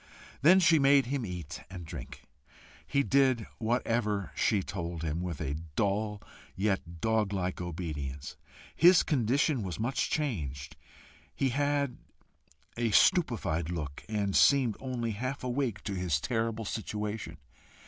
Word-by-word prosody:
Then 175 +6 +7
she 165 -3 +5
made 140 0 +5
him 130 -2 -2
eat 90 -4 -6
and 90 -2 -8
drink. 80 - -9 0.6
He 140 - +2
did 130 -5 +3
whatever 110 - 0
she 100 -3 +2
told 85 -4 -5
him, 80 +1 -2
with 90 -4 -4
a 70 +2 -2 0.2
dull, 105 0 0 0.3
yet 95 -4 -2
doglike 100 -5 0
obedience. 75 -6 -5 0.4
His 175 +1 +7
condition 135 +1 +1
was 95 -2 -5
much 120 +1 0
changed; 75 - -3 0.6
he 135 - +1
had 140 0 0 0.8
a 120 -1 0
stupefied 105 - +3
look, 75 -5 -5
and 100 -3 -1
seemed 130 -6 +5
only 125 -3 -3
half 130 +7 -4
awake 125 -5 -2
to 100 - -3
his 90 -6 0
terrible 115 +2 -2
situation. 105 -5 -4
105 Hz, 130 wpm, -30 LUFS, 90-130 Hz, 0.8 s, Then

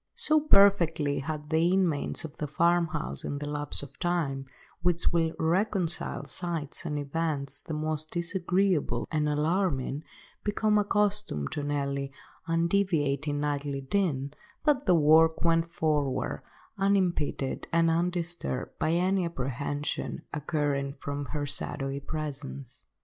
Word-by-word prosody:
So 310 0 +4
perfectly 180 - +4
had 150 +2 -5
the 165 +2 +3
inmates 175 -4 +1
of 155 -1 -9
the 150 - -3
farmhouse 165 - +1
in 145 - -3
the 145 - -4
lapse 145 0 -3
of 140 0 -12
time, 155 -7 -1 0.3
which 175 -1 +2
will 165 -1 +1
reconcile 180 +1 0
sights 170 -3 -3
and 150 -1 -2
events 145 -1 -2
the 160 - -5
most 155 0 -2
disagreeable 175 -6 0
and 150 -2 +1
alarming, 150 -2 0 0.4
become 210 0 +2
accustomed 205 - 0
to 150 - -3
Nelly's 140 -1 -1 0.4
undeviating 165 -5 +1
nightly 145 -1 -2
din, 140 -3 0 0.3
that 295 -4 +2
the 180 - +6
work 160 +1 +5
went 165 0 +3
forward 150 -5 0 0.4
unimpeded 185 -8 +1
and 165 0 +4
undisturbed 170 -5 -2
by 160 - +1
any 185 +2 +2
apprehension 145 -1 -3
accruing 145 -2 -1
from 145 +1 -4
her 145 0 -3
shadowy 140 -1 -2
presence. 140 - -5
155 Hz, 120 wpm, -29 LUFS, 145-175 Hz, 0.4 s, the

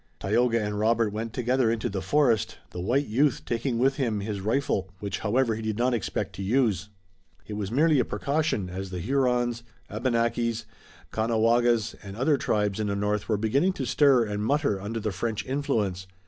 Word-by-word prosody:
Tayoga 115 +5 +2
and 105 -1 -2
Robert 110 -1 +2
went 110 +1 -4
together 125 +1 +1
into 115 -1 -1
the 95 -1 -3
forest, 120 +1 +2
the 90 - -5
white 130 +10 +1
youth 135 +5 +1
taking 120 +1 -1
with 135 +3 +2
him 115 -7 0
his 100 -1 -4
rifle, 105 -3 0
which, 100 -1 -4
however, 115 +2 +1
he 110 - -4
did 110 -1 -2
not 125 +1 +2
expect 115 - -2
to - - -7
use. 105 -3 +1 0.6
It - - -7
was 105 -2 -3
merely 150 +3 +4
a - - +4
precaution, 140 -7 -1
as 95 +1 -5
the 90 - -5
Hurons, 120 +2 +1 0.3
Abenakis, 115 0 0 0.5
Caughnawagas 115 0 +2
and 100 0 -9
other 140 +4 +2
tribes 105 -4 0
in 105 - 0
the 100 - -1
north 105 +1 -1
were 110 - +2
beginning 135 - +2
to 135 - -4
stir 135 -1 +4
and 105 0 -3
mutter 140 -6 +1
under 110 +3 -3
the 110 -1 -2
French 110 +3 -3
influence. 105 -9 -1
115 Hz, 185 wpm, -26 LUFS, 105-125 Hz, 0.6 s, merely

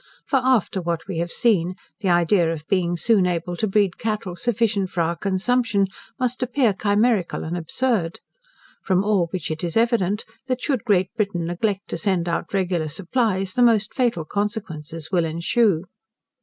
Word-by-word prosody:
For 275 - +2
after 245 -7 +2
what 170 0 -3
we 185 -4 -3
have 170 0 -2
seen, 185 -6 +2 0.2
the 200 -4 -1
idea 175 0 +3
of 155 -2 -5
being 175 -2 0
soon 200 -1 +3
able 175 0 -2
to 220 - 0
breed 195 -2 +1
cattle 215 -6 -2
sufficient 210 -1 0
for 180 - -1
our 170 +1 0
consumption, 200 +3 +1 0.3
must 250 0 -1
appear 250 -3 +2
chimerical 205 -1 +1
and 165 +2 -3
absurd. 180 +1 -1 0.6
From 185 0 +2
all 200 -5 +2
which 170 -2 -4
it 155 +2 -4
is 170 +2 -1
evident, 225 -4 +1 0.2
that 255 -1 -1
should 260 -4 -1
Great 190 -4 +2
Britain 200 -6 -1
neglect 195 +4 -2
to - - -3
send 185 -4 0
out 170 0 -2
regular 180 -5 0
supplies, 190 - -1
the 250 - +1
most 225 -3 +4
fatal 235 - 0
consequences 165 -6 -4
will 175 -3 +3
ensue. 170 +3 +1
195 Hz, 170 wpm, -23 LUFS, 170-220 Hz, 0.6 s, most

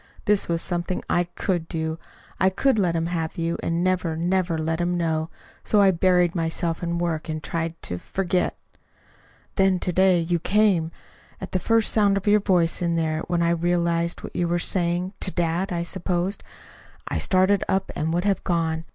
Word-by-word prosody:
This 210 -2 +2
was 170 -1 -1
something 175 0 -2
I 175 - +2
COULD 175 -4 -1
do. 160 0 -3 0.4
I 190 - +4
could 220 +5 +1
let 175 -4 +1
him 165 0 0
have 165 -2 -3
you, 170 0 -1
and 170 +1 -1
never, 180 -3 0
never 175 0 0
let 160 +1 -1
him 175 0 0
know. 160 -1 -1 0.3
So 210 - +2
I 195 -1 +6
buried 180 -1 +3
myself 165 0 -1
in 170 -1 -2
work 165 -2 -2
and 155 -1 -4
tried 165 +3 -3
to 90 - -4
forget. 185 - -1 1.0
"Then 190 -1 +4
to 180 0 -2
day 185 0 +4
you 170 +1 0
came. 195 -3 +2 0.5
At 190 - -7
the 185 - 0
first 225 +3 +2
sound 200 -2 +3
of 195 - -4
your 210 0 +5
voice 180 -5 +1
in 170 -1 +1
there, 160 -1 0
when 175 -1 +1
I 170 - +2
realized 170 0 0
what - - -8
you 175 - +1
were 175 +1 +1
saying 175 +1 -1
(to - - 0
dad, 175 +1 -1
I 170 -1 -1
supposed), 180 +2 -2 0.7
I - - -1
started 190 0 +3
up 190 0 0
and 160 +1 -1
would 175 +3 0
have 195 -2 +1
gone. 165 -2 -1
175 Hz, 190 wpm, -24 LUFS, 165-185 Hz, 1.0 s, I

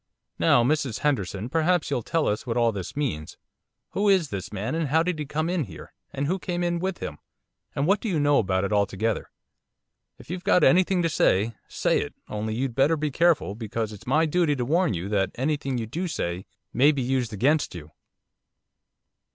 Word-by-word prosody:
'Now, 120 - +5
Mrs 140 -3 0
Henderson, 105 -7 -1
perhaps 165 +2 +1
you'll 125 - 0
tell 165 +6 0
us 105 +4 -2
what 115 0 -1
all 115 -1 +3
this 95 -4 -6
means. 105 - -3 0.5
Who 205 +1 +1
is 185 -7 +3
this 95 -2 -5
man, 105 +4 -3
and 165 -1 0
how 160 +4 +3
did 180 -2 -2
he 150 - -4
come 155 +3 -1
in 175 -4 0
here, 80 -7 -12 0.2
and 140 - -2
who 185 +6 0
came 175 -1 -2
in 175 0 0
with 190 0 -2
him, - - -6 0.6
and 140 - 0
what 200 +4 +3
do 225 - -2
you 170 -5 0
know 145 -1 +4
about 95 -2 0
it 100 - -1
altogether? 105 +2 0 0.9
If - - -11
you've 180 0 -5
got 180 - +4
anything 180 0 +4
to - - +3
say, 110 -7 +2
say - - +1
it, - - -6
only 110 +1 -3
you'd 130 +1 -2
better 140 +6 +3
be 150 -1 -2
careful, 165 - +2
because 110 0 -4
it's 105 - -13
my 155 +5 +3
duty 160 -1 +2
to 125 -3 -2
warn 165 - +2
you 85 +3 -4
that 95 -3 +1
anything 135 0 -1
you 115 - -2
do 170 - -3
say 90 - -3 0.3
may 140 +5 +5
be 140 -4 -2
used 125 -2 0
against 140 - +1
you. 80 -3 -9
140 Hz, 205 wpm, -25 LUFS, 110-165 Hz, 0.9 s, Now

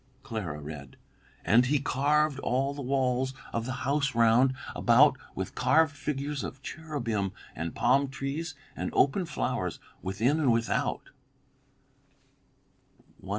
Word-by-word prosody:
Clara 105 - -4
read: 75 -3 -9 0.5
"'And 120 +3 +5
he 145 +3 +3
carved 145 +1 +1
all 135 +1 0
the 140 - -6
walls 130 0 0 0.2
of 115 +1 -2
the - - -2
house 140 -2 +1
round 120 +3 +4 0.2
about - - +5 0.2
with - - -4
carved 160 -3 +3
figures 145 -1 -3
of 135 +1 -7
cherubim 120 - -3 0.2
and 80 +1 -4
palm 140 +2 +3
trees 140 +4 -4 0.2
and - - -3
open 170 +6 +2
flowers, 150 - -2 0.2
within 110 +11 +1
and 140 -6 +3
without.'" 115 0 -1
135 Hz, 120 wpm, -29 LUFS, 115-145 Hz, 0.5 s, And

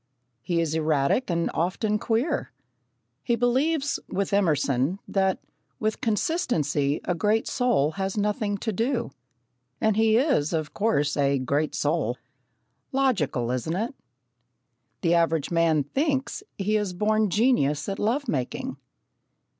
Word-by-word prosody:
He 170 +5 -1
is 165 -2 0
erratic 155 - +1
and 170 -1 0
often 210 +5 0
queer. 240 +9 -1 0.7
He 235 - +1
believes, 275 +5 +1
with 195 +1 -2
Emerson, 150 -4 +2
that 190 -1 +1 0.4
"with 215 0 -1
consistency 155 - 0
a 180 - +1
great 210 +6 +1
soul 245 - +1
has 190 +4 -3
nothing 205 0 0
to 220 +2 -3
do." 235 - -1 0.7
And 220 -2 +2
he 220 0 +4
is, 245 - +2
of 155 -2 -2
course, 150 -10 +1
"a 140 -1 +2
great 140 +4 -1
soul." 145 -5 0 0.7
Logical, 190 - +1
isn't 130 +7 -2
it? 225 +8 -2 1.1
The 170 - +2
average 165 -3 +1
man 165 -3 +3
thinks 270 - -1 0.2
that 195 - -3
he 215 +2 +2
is 205 -3 -2
a - - -12
born 215 +2 +2
genius 190 - +2
at 195 -1 -3
love 255 +7 0
making. 130 - -3
195 Hz, 135 wpm, -26 LUFS, 155-225 Hz, 1.1 s, he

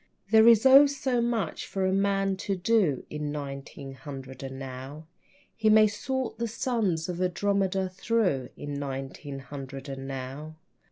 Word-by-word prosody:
There 220 0 +7
is 230 0 +6
oh, 275 +2 +9
so 265 -3 -1
much 235 -3 -2
for 190 -1 -1
a 190 - +1
man 195 0 +1
to 195 0 -2
do 185 - +1
In 150 -1 -3
nineteen 140 -1 -7
hundred 135 -2 -9
and 135 -1 -6
now. 135 +3 -8 0.5
He 220 -1 +2
may 215 0 +7
sort 250 +5 -3
the 235 - 0
suns 220 -8 -1
of 180 0 -4
Andromeda 190 +1 +1
through 185 - 0
In 145 -1 -5
nineteen 135 +1 -5
hundred 135 0 -8
and 135 -1 -6
now. 135 +4 -6
180 Hz, 155 wpm, -28 LUFS, 135-215 Hz, 0.5 s, oh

